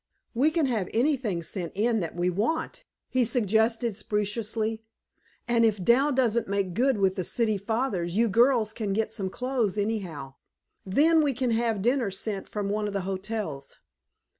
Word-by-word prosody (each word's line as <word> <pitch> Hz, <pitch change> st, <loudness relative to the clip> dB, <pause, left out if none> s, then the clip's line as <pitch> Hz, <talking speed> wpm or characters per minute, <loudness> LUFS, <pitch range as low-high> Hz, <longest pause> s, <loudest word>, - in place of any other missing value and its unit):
"We 265 Hz, +6 st, +3 dB
can 315 Hz, -1 st, +1 dB
have 220 Hz, -8 st, -1 dB
anything 235 Hz, -, +1 dB
sent 170 Hz, 0 st, -5 dB
in 225 Hz, +2 st, +1 dB
that 170 Hz, -4 st, -4 dB
we 175 Hz, +1 st, +1 dB
want," 320 Hz, -, -2 dB, 0.2 s
he 255 Hz, -1 st, +1 dB
suggested 225 Hz, 0 st, +1 dB
speciously, 215 Hz, +1 st, -2 dB, 0.7 s
"and 235 Hz, -1 st, +3 dB
if 210 Hz, -4 st, +2 dB
Dal 265 Hz, +8 st, +4 dB
doesn't 235 Hz, -4 st, +1 dB
make 195 Hz, -2 st, -1 dB
good 255 Hz, +4 st, +2 dB
with 190 Hz, -1 st, +2 dB
the 185 Hz, -, -1 dB
city 220 Hz, +4 st, 0 dB
fathers, 200 Hz, -4 st, -2 dB
you 230 Hz, +1 st, +4 dB
girls 230 Hz, 0 st, +3 dB
can 210 Hz, -4 st, -2 dB
get 220 Hz, +1 st, 0 dB
some 195 Hz, -4 st, -3 dB
clothes 245 Hz, -3 st, -1 dB
anyhow. 185 Hz, -11 st, -3 dB, 0.5 s
Then, 315 Hz, -, +4 dB
we 285 Hz, -4 st, +1 dB
can 250 Hz, -1 st, 0 dB
have 225 Hz, -3 st, 0 dB
dinner 245 Hz, -2 st, +2 dB
sent 195 Hz, +1 st, -5 dB
from 205 Hz, -2 st, -3 dB
one 210 Hz, +1 st, -1 dB
of 205 Hz, -, -5 dB
the 200 Hz, -, -1 dB
hotels." 190 Hz, -6 st, -5 dB
220 Hz, 165 wpm, -27 LUFS, 195-240 Hz, 0.7 s, Dal